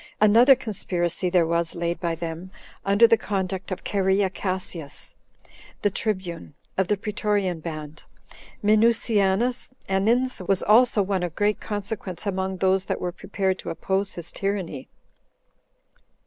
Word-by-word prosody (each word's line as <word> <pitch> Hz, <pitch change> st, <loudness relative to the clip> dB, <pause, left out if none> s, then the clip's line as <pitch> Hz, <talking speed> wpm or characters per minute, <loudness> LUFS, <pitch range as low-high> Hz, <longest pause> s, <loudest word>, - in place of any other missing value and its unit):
Another 230 Hz, +6 st, +7 dB
conspiracy 185 Hz, -7 st, -2 dB
there 175 Hz, -2 st, +3 dB
was 170 Hz, 0 st, -1 dB
laid 170 Hz, 0 st, -2 dB
by 170 Hz, -2 st, -1 dB
them, 165 Hz, +2 st, -6 dB, 0.3 s
under 200 Hz, +4 st, +5 dB
the 230 Hz, 0 st, +5 dB
conduct 190 Hz, -2 st, -3 dB
of 185 Hz, -, -5 dB
Cherea 190 Hz, -1 st, +1 dB
Cassius, 185 Hz, -6 st, -4 dB, 0.7 s
the 205 Hz, -, +3 dB
tribune 185 Hz, -8 st, -3 dB, 0.2 s
[of 190 Hz, -1 st, +1 dB
the 210 Hz, -, +1 dB
Pretorian 205 Hz, -3 st, -1 dB
band]. 155 Hz, -1 st, -7 dB, 0.6 s
Minucianus 215 Hz, +1 st, +2 dB, 0.2 s
Annins 225 Hz, +6 st, +1 dB
was 195 Hz, -2 st, +1 dB
also 225 Hz, -1 st, +5 dB
one 190 Hz, -1 st, -1 dB
of 175 Hz, -2 st, -3 dB
great 210 Hz, 0 st, +1 dB
consequence 205 Hz, -3 st, -5 dB
among 190 Hz, -1 st, -2 dB
those 190 Hz, 0 st, +2 dB
that -, -, -2 dB
were 180 Hz, -, -2 dB
prepared 190 Hz, 0 st, -2 dB
to -, -, -6 dB
oppose 190 Hz, +3 st, -1 dB
his 175 Hz, -1 st, -4 dB
tyranny. 195 Hz, -9 st, -3 dB
190 Hz, 135 wpm, -24 LUFS, 175-210 Hz, 0.7 s, Another